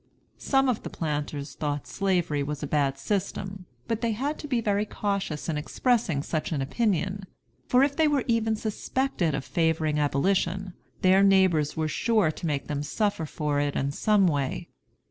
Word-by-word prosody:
Some 270 -1 +2
of 250 -4 0
the - - -6
planters 145 -2 -3
thought 145 -2 -3
Slavery 180 -7 0
was 150 +1 -4
a - - 0
bad 140 -2 +1
system, 190 +3 -3 0.2
but 230 -1 -1
they 230 -2 +1
had 280 +7 -2
to 295 - -6
be 250 -4 +1
very 205 -2 +1
cautious 200 -7 -3
in 155 -3 -1
expressing 180 - 0
such 155 +1 -2
an 155 - 0
opinion; 195 - 0 0.4
for 255 +2 +5
if 285 0 +1
they 320 -1 +4
were 290 -3 +2
even 225 -2 +2
suspected 215 - -1
of 135 - -4
favoring 160 -2 +1
abolition, 180 +6 0 0.3
their 190 +1 +6
neighbors 190 -7 +4
were 160 -1 0
sure 215 0 +2
to 165 - -5
make 145 -3 -1
them 145 -1 -3
suffer 200 +1 -1
for 150 -1 -1
it 145 0 0
in 140 +1 0
some 205 +6 +3
way. 140 -6 -1
185 Hz, 175 wpm, -27 LUFS, 150-215 Hz, 0.4 s, their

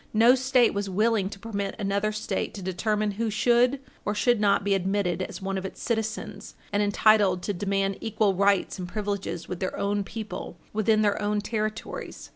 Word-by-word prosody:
No 230 +3 +7
State 255 -2 +3
was 200 -1 -2
willing 210 0 +1
to 200 - -9
permit 200 -2 -4
another 200 0 0
State 215 0 -3
to 195 - -7
determine 210 +3 0
who 225 +3 -2
should 240 +5 +3 0.2
or 210 - -1
should 240 +2 +3
not 200 -1 +3
be 200 0 +2
admitted 190 -2 0
as 185 +1 -5
one 195 0 -1
of - - -8
its 190 - -7
citizens, 220 -3 -3 0.2
and 205 - +2
entitled 205 -3 +3
to 205 - -1
demand 195 +1 -1
equal 215 -2 +1
rights 195 0 +2
and 180 - -4
privileges 200 -4 -3
with 180 - -5
their 185 - -3
own 200 0 0
people, 200 -4 -7 0.2
within 215 0 +3
their 205 0 +1
own 210 0 +1
territories. 215 0 -4
205 Hz, 185 wpm, -26 LUFS, 195-215 Hz, 0.2 s, No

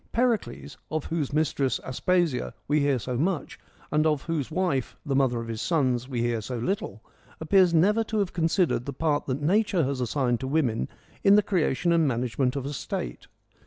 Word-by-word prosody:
Pericles, 230 - -1
of 155 -1 -2
whose 160 -4 -2
mistress, 145 -3 0
Aspasia, 140 - 0
we 150 +1 +2
hear 140 -2 +2
so 125 +1 -3
much, 170 -2 -2 0.3
and 155 +1 +3
of 150 -3 0
whose 160 -5 -2
wife, 160 -7 -1
the 140 -3 -1
mother 130 -3 +2
of 115 - -6
his 115 -1 -4
sons, 130 -7 0
we 125 -3 -2
hear 120 -1 0
so 125 +3 -5
little, 115 - -3 0.4
appears 180 +3 +4
never 205 +7 +3
to 215 - -3
have 200 -3 0
considered 165 -6 +1
the 140 - -3
part 150 +1 0
that 135 +2 -2
nature 195 +1 +2
has 135 -1 -2
assigned 125 -1 0
to 130 - -4
women 130 - 0 0.3
in 200 0 +7
the 210 - +5
creation 170 -4 +1
and 165 -2 +3
manage 125 -1 -2
ment 125 -1 +2
of 135 -2 -3
a 145 - -4
state. - - -5
145 Hz, 195 wpm, -26 LUFS, 125-170 Hz, 0.4 s, in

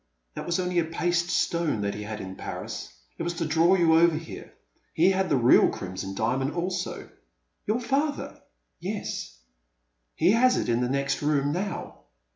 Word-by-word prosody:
That - - -6
was 175 +1 0
only 180 -1 +1
a 165 - +1
paste 175 +1 0
stone 170 -11 0
that 100 0 -1
he 105 - -6
had 105 0 -5
in 95 0 -7
Paris. - - -6 0.3
It - - -3
was 170 +1 -2
to 165 - -2
draw 165 +4 +4
you 170 -3 +4
over 170 -1 +5
here. 160 0 -9 0.4
He 175 +4 +5
had 190 0 0
the 140 - +3
real 120 0 +6
Crimson 95 +1 -6
Diamond 130 +7 0
also.'* 180 +1 -3 0.6
Your 215 +3 +1
father?'' 280 +4 -2 0.4
Yes. - - -5 0.8
He 185 - +4
has 250 +3 +4
it - - -1
in 120 +1 +2
the 125 - 0
next 140 +1 -1
room 145 -1 +1
now. 185 +3 -4
165 Hz, 175 wpm, -26 LUFS, 125-180 Hz, 0.8 s, real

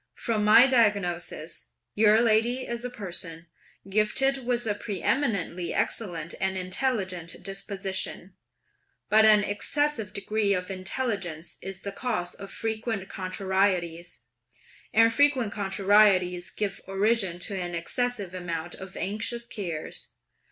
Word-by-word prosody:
From 220 -2 -1
my 215 +4 +8
diagnosis, 205 - 0 0.3
your 215 +1 +5
lady 235 +3 +2
is 235 0 -4
a 250 - -3
person, 175 -7 -6 0.4
gifted 255 +7 +1
with 240 -1 +1
a 210 - +1
preëminently 200 -3 -1
excellent, 180 -6 -2
and 190 0 0
intelligent 185 -3 -2
disposition; 195 -1 -3 0.8
but 220 +1 +6
an 210 -1 +7
excessive 225 +2 0
degree 205 0 0
of 180 +1 -3
intelligence 185 -4 -3
is 190 0 -7
the 200 - -4
cause 200 -5 -2
of 195 0 -9
frequent 220 -3 -3
contrarieties; 185 - -1 0.7
and 225 +1 +5
frequent 265 -6 +3
contrarieties 195 -2 +3
give 200 -1 -3
origin 195 -2 +1
to 190 +3 -3
an 175 -1 -4
excessive 205 +2 -2
amount 175 -2 -4
of 190 0 -9
anxious 220 +4 -2
cares. 175 -9 -5
200 Hz, 115 wpm, -27 LUFS, 185-225 Hz, 0.8 s, my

